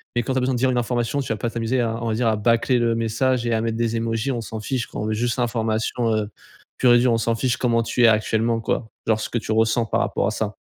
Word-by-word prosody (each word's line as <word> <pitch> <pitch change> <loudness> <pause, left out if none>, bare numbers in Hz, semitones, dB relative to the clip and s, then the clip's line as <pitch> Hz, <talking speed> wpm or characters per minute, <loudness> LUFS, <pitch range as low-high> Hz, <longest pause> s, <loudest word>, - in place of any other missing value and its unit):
mais 120 - +1
quand 130 - -3
tu - - -1
as - - +2
besoin 130 +1 0
de - - -2
dire 130 0 +2
une 125 - -1
information 120 +2 -1
tu 125 -5 -2
vas - - -5
pas 115 +3 -2
t'amuser 115 +2 -1
à, 115 0 -2
on 115 - -2
va 110 - 0
dire 115 +2 0
à 110 - +1
bâcler 115 +3 +2
le 115 -1 +1
message 115 +2 0
et 115 - 0
à 110 - +1
mettre 115 -1 -2
des 115 0 0
émojis, 115 +3 -1
on 120 - -2
s'en 110 0 -6
fiche 125 -1 -2
quoi. - - -6
On 105 - -2
veut 110 - -1
juste 120 +3 -1
l'information 115 -1 0
heu, 105 -1 -2 0.5
pure 125 -2 +5
et 120 - +6
dure. 125 0 +3
On 115 - +2
s'en 115 0 0
fiche 125 +2 0
comment 115 -2 +1
tu 120 +1 0
es - - +8
actuellement 115 +1 +1
quoi. 110 +1 -2 0.2
Genre 110 -1 +2
ce - - -4
que 120 - -2
tu 110 - -4
ressens 110 +1 +2
par - - 0
rapport - - 0
à - - 0
ça. - - -3
115 Hz, 310 wpm, -22 LUFS, 110-120 Hz, 0.5 s, es